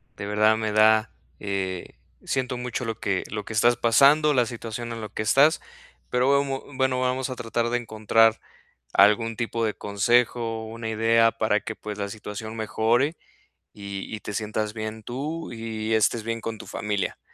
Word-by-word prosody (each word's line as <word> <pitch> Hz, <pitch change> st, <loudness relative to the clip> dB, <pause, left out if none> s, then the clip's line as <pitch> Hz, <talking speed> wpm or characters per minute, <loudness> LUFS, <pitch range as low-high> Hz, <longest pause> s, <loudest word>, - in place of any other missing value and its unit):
de 100 Hz, -, -6 dB
verdad, 105 Hz, +1 st, +3 dB
me 110 Hz, -1 st, -2 dB
da, 110 Hz, +1 st, +4 dB, 0.3 s
eh, 95 Hz, -3 st, -3 dB, 0.3 s
siento 130 Hz, -2 st, -1 dB
mucho 125 Hz, 0 st, -4 dB
lo 115 Hz, -1 st, -5 dB
que 95 Hz, -2 st, 0 dB
lo 105 Hz, 0 st, -4 dB
que -, -, -9 dB
estás 120 Hz, +3 st, +4 dB
pasando, 140 Hz, +7 st, +5 dB
la 125 Hz, -3 st, +3 dB
situación 115 Hz, 0 st, -6 dB
en 115 Hz, -, -6 dB
la 105 Hz, -, -6 dB
que 110 Hz, -, -4 dB
estás, 140 Hz, +8 st, +4 dB, 0.5 s
pero 125 Hz, +2 st, +2 dB
bemo 135 Hz, -1 st, -2 dB
bueno, 130 Hz, -1 st, +1 dB
vamos 130 Hz, +1 st, 0 dB
a 130 Hz, -, -4 dB
tratar 115 Hz, 0 st, -2 dB
de 120 Hz, -, +1 dB
encontrar 115 Hz, -1 st, +2 dB, 0.5 s
algún 105 Hz, +3 st, +4 dB
tipo 115 Hz, -1 st, -2 dB
de 110 Hz, -, -1 dB
consejo 115 Hz, +2 st, +1 dB
o -, -, -8 dB
una 115 Hz, 0 st, -6 dB
idea 115 Hz, +1 st, +3 dB
para 110 Hz, -2 st, 0 dB
que, 110 Hz, +2 st, -6 dB
pues, 105 Hz, -1 st, -7 dB
la 100 Hz, -1 st, -3 dB
situación 110 Hz, +1 st, -7 dB
mejore 115 Hz, +6 st, +1 dB, 0.6 s
y 100 Hz, +1 st, -6 dB
y 105 Hz, -, -9 dB
te -, -, -6 dB
sientas 105 Hz, 0 st, -2 dB
bien 110 Hz, 0 st, -6 dB
tú 150 Hz, +8 st, -5 dB
y 110 Hz, -1 st, -4 dB
estés 110 Hz, +1 st, +2 dB
bien 115 Hz, +1 st, -3 dB
con 115 Hz, 0 st, -5 dB
tu -, -, -11 dB
familia. 105 Hz, -2 st, -3 dB
115 Hz, 180 wpm, -25 LUFS, 110-120 Hz, 0.6 s, pasando